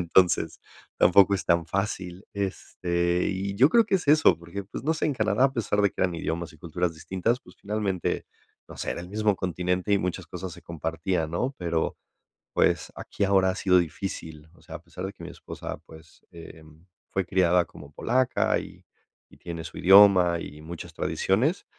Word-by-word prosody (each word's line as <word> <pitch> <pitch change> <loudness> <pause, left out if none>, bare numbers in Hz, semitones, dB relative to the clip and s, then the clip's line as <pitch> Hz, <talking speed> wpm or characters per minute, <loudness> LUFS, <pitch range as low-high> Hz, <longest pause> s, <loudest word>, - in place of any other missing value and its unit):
Entonces 90 -1 +3 0.4
tampoco 100 +2 +6
es 95 - -3
tan 85 -1 +2
fácil. 95 0 -3
Este, 90 -3 -1
y 95 +1 -3
yo 125 +8 +6
creo 230 +7 +5
que 195 -2 -1
es 175 - -6
eso, 150 - +6
porque, 85 +4 -7
pues 100 - -8
no 155 +4 +1
sé, - - -2
en 150 - +1
Canadá, 110 +2 +2
a 135 - +3
pesar 105 -5 0
de 100 - +3
que - - -8
eran 90 -2 +1
idiomas 85 +1 -3
y - - -18
culturas 85 +1 -2
distintas, 95 +9 -1
pues, - - -17
finalmente, 100 -3 -2 0.4
no - - -12
sé, - - -3
era - - -3
el 90 - -9
mismo 105 0 +1
continente 90 +2 -1
y 100 - +4
muchas 90 -1 -3
cosas 90 +2 -6
se 85 - -13
compartían, 80 0 -2
¿no?, 125 +11 -2
pero, 85 -2 -1 0.6
pues, - - +2
aquí - - -6
ahora 95 -1 +3
ha - - -3
sido 95 -2 +3
difícil. 80 -2 -4
O 80 - -22
sea, 80 - -8
a 75 - -15
pesar 90 +2 -7
de 95 - -6
que 100 - -15
mi - - -7
esposa, - - -7
pues, 80 0 -16
em, 80 -1 -13 0.2
fue 95 - -1
criada 90 -1 +3
como 70 0 -14
polaca 125 - +1
y - - -10 0.5
y - - -16
tiene 85 -1 -7
su 80 - -9
idioma 95 -3 +7
y 75 -2 -9
muchas 80 +2 -8
tradiciones, 130 - 0
90 Hz, 195 wpm, -26 LUFS, 85-100 Hz, 0.6 s, idioma